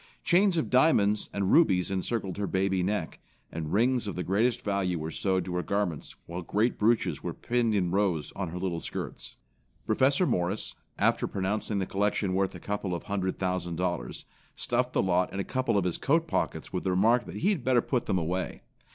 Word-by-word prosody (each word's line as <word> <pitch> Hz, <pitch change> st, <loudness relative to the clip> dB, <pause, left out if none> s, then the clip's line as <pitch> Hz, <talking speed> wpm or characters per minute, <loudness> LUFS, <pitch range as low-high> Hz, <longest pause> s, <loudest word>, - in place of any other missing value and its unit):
Chains 185 Hz, 0 st, +4 dB
of 160 Hz, -, -1 dB
diamonds 110 Hz, -7 st, +3 dB
and 100 Hz, -1 st, 0 dB
rubies 95 Hz, -, +4 dB
encircled 95 Hz, 0 st, -2 dB
her 100 Hz, -1 st, -1 dB
baby 95 Hz, 0 st, +1 dB
neck, 90 Hz, -3 st, -2 dB, 0.3 s
and 80 Hz, -1 st, -4 dB
rings 120 Hz, +2 st, +2 dB
of 100 Hz, -, -4 dB
the 90 Hz, -, -2 dB
greatest 115 Hz, +6 st, +1 dB
value 100 Hz, -3 st, 0 dB
were 80 Hz, +1 st, -4 dB
sewed 95 Hz, -1 st, 0 dB
to 90 Hz, -, -4 dB
her 90 Hz, -, 0 dB
garments, 100 Hz, -6 st, -2 dB
while 85 Hz, +2 st, -5 dB
great 105 Hz, +7 st, 0 dB
brooches 115 Hz, +2 st, +2 dB
were -, -, -4 dB
pinned 120 Hz, -2 st, 0 dB
in 90 Hz, -4 st, +1 dB
rows 95 Hz, -6 st, 0 dB
on 95 Hz, -2 st, -3 dB
her 85 Hz, +2 st, -6 dB
little 90 Hz, -2 st, -2 dB
skirts. -, -, -6 dB, 0.5 s
Professor 135 Hz, -, +3 dB
Morris, 90 Hz, -, -1 dB, 0.2 s
after -, -, +2 dB
pronouncing 100 Hz, +2 st, -2 dB
the 95 Hz, -, 0 dB
collection 100 Hz, 0 st, 0 dB
worth 95 Hz, 0 st, 0 dB
a -, -, -8 dB
couple 100 Hz, -1 st, -3 dB
of 85 Hz, -, -6 dB
hundred 95 Hz, -2 st, -2 dB
thousand 90 Hz, -2 st, -2 dB
dollars, 85 Hz, -8 st, -3 dB, 0.3 s
stuffed 125 Hz, +1 st, -1 dB
the -, -, +2 dB
lot 90 Hz, -1 st, +1 dB
in 95 Hz, -, -4 dB
a -, -, 0 dB
couple 130 Hz, -3 st, 0 dB
of 100 Hz, -, +2 dB
his 90 Hz, -2 st, -2 dB
coat 165 Hz, +3 st, +2 dB
pockets 80 Hz, -, -2 dB
with 90 Hz, -, -2 dB
the 95 Hz, -, 0 dB
remark 115 Hz, +7 st, +3 dB
that -, -, -8 dB
he 190 Hz, -, +1 dB
had 185 Hz, -11 st, 0 dB
better 125 Hz, -1 st, +4 dB
put 125 Hz, 0 st, -1 dB
them 95 Hz, -, +1 dB
away! 90 Hz, +2 st, -2 dB
100 Hz, 205 wpm, -28 LUFS, 90-115 Hz, 0.5 s, Chains